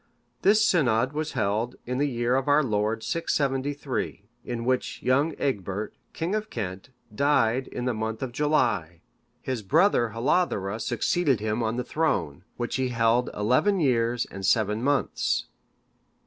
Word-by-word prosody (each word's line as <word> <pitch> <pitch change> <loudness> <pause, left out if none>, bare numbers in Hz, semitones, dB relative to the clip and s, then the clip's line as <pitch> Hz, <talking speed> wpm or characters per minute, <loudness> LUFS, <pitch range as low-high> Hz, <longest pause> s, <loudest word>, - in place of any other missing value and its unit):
This 215 +2 +5
synod 130 - +2
was 155 +1 -3
held 110 +5 -1
in 125 +1 -2
the 145 0 +2
year 120 0 0
of 135 +1 0
our 145 +1 +4
Lord 110 -1 -1
673. 140 -7 -2 0.2
In 120 -1 -4
which 130 0 -1
year 140 +6 +2
Egbert, 100 -5 -2 0.2
king 170 +4 -3
of 215 0 -2
Kent,(570) 105 +3 -7
died 130 -1 +2
in 125 - -5
the 125 - +1
month 110 +2 -3
of 130 - -4
July; 120 - 0 0.4
his 130 -4 -2
brother 135 - +3
Hlothere(571) 115 - 0
succeeded 145 - +1
him 110 +2 -1
on 110 0 -1
the 125 - -2
throne, 90 - -1
which 120 +2 -2
he 130 -1 0
held 115 +1 +2
eleven 130 - +2
years 120 -5 +1
and 95 - -7
seven 105 +2 +2
months. 145 +1 0
125 Hz, 150 wpm, -26 LUFS, 110-145 Hz, 0.4 s, This